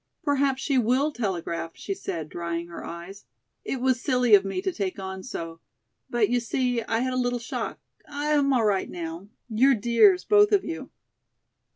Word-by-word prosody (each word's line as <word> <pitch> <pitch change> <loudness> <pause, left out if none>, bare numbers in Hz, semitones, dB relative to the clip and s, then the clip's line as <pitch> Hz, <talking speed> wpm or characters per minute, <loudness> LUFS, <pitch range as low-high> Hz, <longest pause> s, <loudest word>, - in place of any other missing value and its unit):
"Perhaps 275 -2 +1
she 275 -3 +2
will 255 +6 +2
telegraph," 170 - -3
she 395 - -4
said, 165 - -5
drying 170 +1 -4
her 170 - -8
eyes. 175 +4 -9 0.4
"It 270 - -3
was 255 -1 +1
silly 250 -5 +2
of 200 -1 +8
me 195 - -3
to 380 - -1
take 195 - -3
on 190 -1 -6
so, 165 -7 -6 0.5
but, 235 -3 +2
you 245 +2 +1
see, 245 +1 -1
I 225 +1 -1
had 255 0 -1
a 255 - +1
little 245 0 0
shock 230 -1 -4 0.3
I'm 290 -1 +1
all 245 -4 +3
right 200 -2 +1
now. 170 +2 -6 0.2
You're 255 +4 +4
dears, 240 - +4
both 415 0 +5
of 400 - +3
you." 330 0 -5
240 Hz, 180 wpm, -26 LUFS, 190-270 Hz, 0.5 s, of